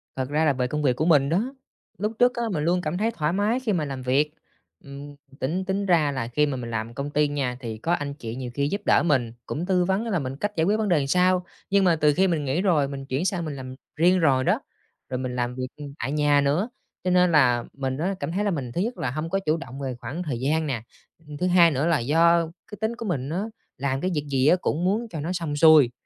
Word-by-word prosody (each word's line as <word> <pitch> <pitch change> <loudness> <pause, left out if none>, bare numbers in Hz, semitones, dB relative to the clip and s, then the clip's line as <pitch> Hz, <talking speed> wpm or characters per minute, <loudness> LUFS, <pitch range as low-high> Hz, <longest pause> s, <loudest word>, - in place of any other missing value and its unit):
Thật 130 0 -3
ra 155 +2 +1
là 145 - +3
về 125 -1 -1
công 150 +4 -2
việc 130 -4 +2
của 155 - -1
mình 145 -5 +4
đó! 215 - 0 0.4
Lúc 210 +4 -1
trước 245 0 +5
á 235 - -1
mình 155 -5 -1
luôn 175 +3 +2
cảm 165 +1 -2
thấy 220 +4 +1
thoải 155 -7 -1
mái 210 +6 +1
khi 230 -6 -1
mà 160 -4 0
làm 135 -2 -5
việc. 135 +4 +1 0.5
Ừm, 140 +1 -10 0.2
tính 175 +8 -2
tính 195 +1 -1
ra 165 -6 +3
là 130 -4 -3
khi 150 +5 +2
mà 140 -3 -2
mình 120 -2 -6
làm 110 +1 -3
công 140 +3 -4
ty 150 0 +2
nha 135 -4 -2
thì 115 -4 -6
có 165 +10 -1
anh 145 -4 -2
chị 115 -5 -7
nhiều 125 -1 -5
khi 140 +1 0
giúp 200 +7 -2
đỡ - - +4
mình, 125 -8 +1
cũng 160 +4 -3
tư 180 -1 +2
vấn 195 +5 0
á 230 - -3
là 180 - +1
mình 130 -1 -4
cách 205 +8 -2
giải 160 - +2
quyết 205 +4 +2
vấn 215 -2 0
đề 150 -6 +2
sao. 180 +3 +3 0.2
Nhưng 200 0 +3
mà 175 -3 +4
từ 150 -1 +3
khi 190 +6 +3
mình 160 -5 0
nghỉ 140 +6 0
rồi 165 -8 +2
mình 135 -1 -6
chuyển 135 +5 -2
sang 180 -3 -1
mình 150 -2 -4
làm 130 -1 -8 0.2
riêng 180 +4 +4
rồi 135 -5 +3
đó, - - +2 0.5
rồi 125 - -2
mình 125 -1 -4
làm 120 0 -2
việc 130 0 -3 0.3
tại 135 - -2
nhà 145 -1 +3
nữa, 150 - +1 0.3
cho 185 - 0
nên 180 -1 +4
là 125 -6 +4
mình 135 -1 -3
á 185 +6 -1
cảm - - -3
thấy 195 +4 -1
là 205 - +1
mình 135 -8 -3
thứ 175 - -1
nhất 235 +5 -2
là 125 - -2
hông 155 +4 -4
có 195 +3 0
chủ 155 -4 0
động 135 -4 -8
về 135 -2 -3
khoảng 140 +10 -5
thời 140 -8 -3
gian 155 +4 0
nè. 125 -6 -2 0.5
Ừm, 150 -1 -8
thứ 180 - 0
hai 175 -2 +6
nữa 140 +3 0
là 165 -3 +3
do 165 +7 +4 0.3
cái 210 - -7
tính 220 +2 -1
của 230 - -7
mình 145 -8 -2
á, 180 +5 -1 0.3
làm 135 0 -1
cái 185 - 0
việc 150 -2 -2
gì 135 0 +2
á 175 - +6
cũng 165 - -1
muốn 215 +5 0
cho 165 - -6
nó 165 +5 -3
xong 165 -5 -3
xuôi, 150 -5 +7
150 Hz, 275 wpm, -25 LUFS, 135-180 Hz, 0.5 s, xuôi